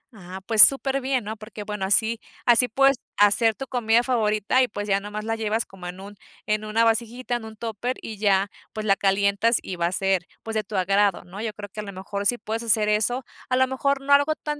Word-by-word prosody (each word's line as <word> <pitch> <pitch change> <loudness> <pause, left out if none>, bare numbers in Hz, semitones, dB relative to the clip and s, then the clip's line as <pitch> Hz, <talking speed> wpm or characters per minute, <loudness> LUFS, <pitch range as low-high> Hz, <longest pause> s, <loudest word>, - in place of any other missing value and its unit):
Ah, 190 -1 -10
pues 220 -1 +6
superbién, 270 -1 +5
¿no? 215 +1 -6
Porque, 215 0 -9
bueno, 210 -2 -4
así 220 +4 +2 0.3
así 245 +1 +5
puedes 275 +3 +3 0.2
hacer 215 +2 +4
tu 270 - -7
comida 235 -2 +1
favorita 225 -1 +1
y, 255 - +2
pues, 205 -2 -6
ya 195 0 +1
nomás 210 +1 -7
la 225 0 -1
llevas 220 0 -1
como 185 -2 -11
en 180 +1 -8
un 200 +1 -11 0.3
en 215 0 -1
una 215 +2 +1
vasijita, 235 +2 -1
en 235 -2 -5
un 220 0 -10
tóper, 230 +3 -4
y 220 - -8
ya, 200 -1 +1 0.2
pues, 215 0 -5
la 195 -2 +3
calientas 200 +4 +1
y 185 - -6
va 170 -1 0
a - - -3
ser, 190 -1 0 0.2
pues, 225 - -6
de 215 -1 -1
tu 210 +1 -9
agrado, 195 +1 +1
¿no? 185 +3 -10
Yo 225 -1 -3
creo 205 0 -9
que 205 - -11
a - - -4
lo 200 - -8
mejor 200 +2 -3
sí 245 - +2
puedes 220 +2 -4
hacer 215 -2 +2
eso. 230 +5 0 0.2
A 255 - +1
lo 260 - +4
mejor 270 +1 -1
no 280 +1 +1
algo 285 +2 +3
tan 300 -1 -5
215 Hz, 240 wpm, -23 LUFS, 200-240 Hz, 0.3 s, pues